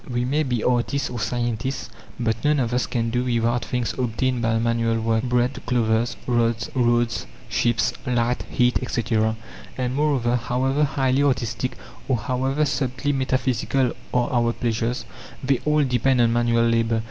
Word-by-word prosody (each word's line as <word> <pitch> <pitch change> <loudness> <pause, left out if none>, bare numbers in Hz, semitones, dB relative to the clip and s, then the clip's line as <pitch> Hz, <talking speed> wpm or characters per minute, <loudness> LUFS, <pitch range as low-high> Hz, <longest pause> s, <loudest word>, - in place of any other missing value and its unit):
We 120 0 -1
may 145 +4 +1
be 125 -6 -1
artists 125 +2 0
or 120 - -4
scientists; 120 +3 -2 0.3
but 115 -2 -1
none 150 0 +3
of 120 -2 0
us 125 - +1
can 115 -2 -1
do 125 +1 0
without 120 -1 +1
things 125 -2 -2
obtained 125 0 -1
by 115 -1 +1
manual 115 0 +1
work 110 0 +1
bread, 125 +1 0
clothes, 115 -1 +1
roads, 120 0 +1 0.2
ships, 120 +1 +1
light, 125 0 +1
heat, 125 0 +2
etc. 110 -3 0 0.4
And, 125 -1 -1
moreover, 135 -4 +1
however 130 +4 +1
highly 135 -1 +1
artistic 125 -3 0 0.3
or 130 - +2
however 130 +6 0
subtly 140 0 -1
metaphysical 130 -1 0 0.2
are 125 -1 +1
our 120 -1 +2
pleasures, 115 +1 -2 0.4
they 135 -1 +2
all 150 0 +3
depend 130 0 +2
on 115 -1 +4
manual 115 0 +2
labour. 115 0 +2
120 Hz, 150 wpm, -23 LUFS, 115-130 Hz, 0.4 s, on